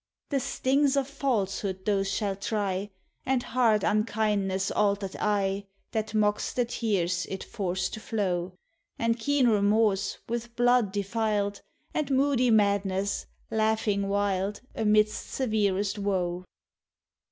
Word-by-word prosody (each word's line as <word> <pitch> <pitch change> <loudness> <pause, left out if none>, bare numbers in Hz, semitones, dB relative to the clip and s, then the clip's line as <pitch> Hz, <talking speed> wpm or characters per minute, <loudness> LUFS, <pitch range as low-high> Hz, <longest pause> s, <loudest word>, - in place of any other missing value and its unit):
247 - - -6 0.5
The - - +5
Btings 275 +1 +1
of 270 - -3
falsehood 200 -8 -2
those 195 -2 +1
shall 200 -1 -1
try, 200 -1 -2 0.3
And 260 -2 +1
hard 225 -4 +2
unkindness' 210 -3 +1
altered 200 -2 0
eye, 200 -1 0 0.2
That 220 0 -2
mocks 210 -1 +1
the 245 - +1
tears 185 -7 -1
it 190 - -4
forced 185 -3 -2
to - - -5
flow; 185 -5 -2 0.4
And 230 0 0
keen 280 +2 +2
remorse, 205 -2 +2
with 235 0 -4
blood 245 -4 +3
defiled, 205 0 -1 0.3
And 300 -3 -1
moody 265 -2 +3
madness, 200 -2 +1 0.2
laughing 215 -2 +1
wild 200 0 0
Amid 215 -1 +4
severest 210 -3 -1
woe. 185 -3 -1
210 Hz, 120 wpm, -28 LUFS, 195-225 Hz, 0.5 s, The